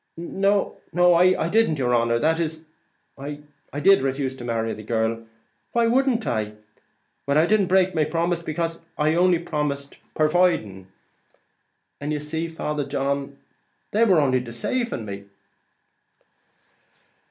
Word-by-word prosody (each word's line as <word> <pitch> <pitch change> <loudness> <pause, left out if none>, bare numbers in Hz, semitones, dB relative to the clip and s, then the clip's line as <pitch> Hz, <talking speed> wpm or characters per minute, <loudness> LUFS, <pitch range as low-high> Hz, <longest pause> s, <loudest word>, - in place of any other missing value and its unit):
"No 195 +4 0 0.2
I 180 0 +4
didn't, 215 -6 +2
yer 125 -2 0
honer; 115 0 +2
that 160 +6 +1
is, 160 -1 -3 0.5
I 145 +1 -7 0.3
did 195 +3 +5
refuse 135 0 -2
to 120 - -9
marry 115 -1 -1
the 110 - -8
girl; 115 +1 -2 0.5
why 235 -1 +3
wouldn't 250 -1 +2
I? 110 -5 -2 0.7
But 140 +1 +2
I 155 - +5
didn't 205 0 +2
break 185 0 +3
my 155 - +2
promise, 170 +2 -1
becase 165 +1 -3
I 155 +1 +2
only 175 +1 +4
promised, 145 -4 -3 0.2
purviding; 155 - +1 1.1
and 145 +1 -4
you 150 - -1
see, 160 +3 -3
Father 150 -2 -3
John, 140 0 -2 0.5
they 220 +3 +3
was 195 -6 +4
only 135 -4 +3
decaving 120 - -3
me." 100 -1 -7
155 Hz, 130 wpm, -23 LUFS, 130-175 Hz, 1.1 s, did